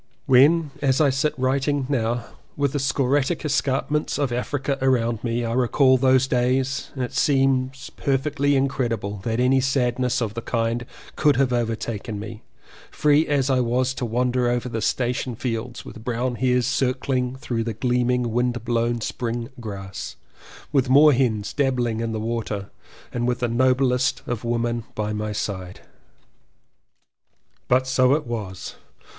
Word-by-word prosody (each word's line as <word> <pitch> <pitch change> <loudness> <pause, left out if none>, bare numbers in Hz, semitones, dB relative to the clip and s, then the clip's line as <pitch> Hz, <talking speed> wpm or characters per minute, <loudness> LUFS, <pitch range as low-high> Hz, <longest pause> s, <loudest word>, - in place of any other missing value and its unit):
When 145 +3 +5
as 135 -2 +2
I 145 -3 +4
sit 135 +3 0
writing 135 +2 0
now, 120 -3 -1 0.3
with 140 -2 +1
the 145 - 0
scoriae 135 +4 0
escarpments 145 +1 0
of 140 -4 0
Africa 135 +3 -2
around 120 -4 +1
me, 120 0 -1
I 115 - -2
recall 130 +2 +4
those 130 0 +4
days, 130 +1 0
it 130 -1 -3
seems 135 -2 +1
per 135 -1 0
fectly 145 0 0
incredible 120 -7 -1
that 115 0 -1
any 130 +1 +3
sadness 125 -1 +1
of 110 -4 -2
the 115 - -4
kind 115 0 -1 0.3
could 150 -2 +3
have 130 -1 +2
overtaken 115 -2 -2
me, 110 +1 -8 0.5
free 150 +1 +3
as 140 -2 +1
I 130 - +3
was 125 +1 +1
to 130 - -5
wander 125 +1 +1
over 120 +1 -1
the 115 -2 -3
station 125 +2 -1
fields 120 0 -4
with 115 - -10
brown 125 +1 -1
hares 125 0 +2
circling 130 0 0
through 120 -3 -3
the 115 -2 -4
gleaming 125 0 +1
windblown 120 -1 0
spring 115 +1 -3
grass, 100 -4 -7 0.6
with 135 -3 +2
moor 145 +3 +7
hens 115 -5 0
dabbling 125 -5 0
in 115 0 -2
the 110 - -3
water 110 -3 -3 0.4
and 120 0 -1
with 125 0 +1
the 120 - +1
noblest 125 +1 +2
of 120 -2 -4
women 120 0 -1
by 105 0 -2
my 105 0 -3
side. 95 -3 -5 1.9
But 130 +1 +3
so 130 +1 +3
it 150 -1 -3
was. 105 -6 -5
125 Hz, 150 wpm, -23 LUFS, 115-135 Hz, 1.9 s, moor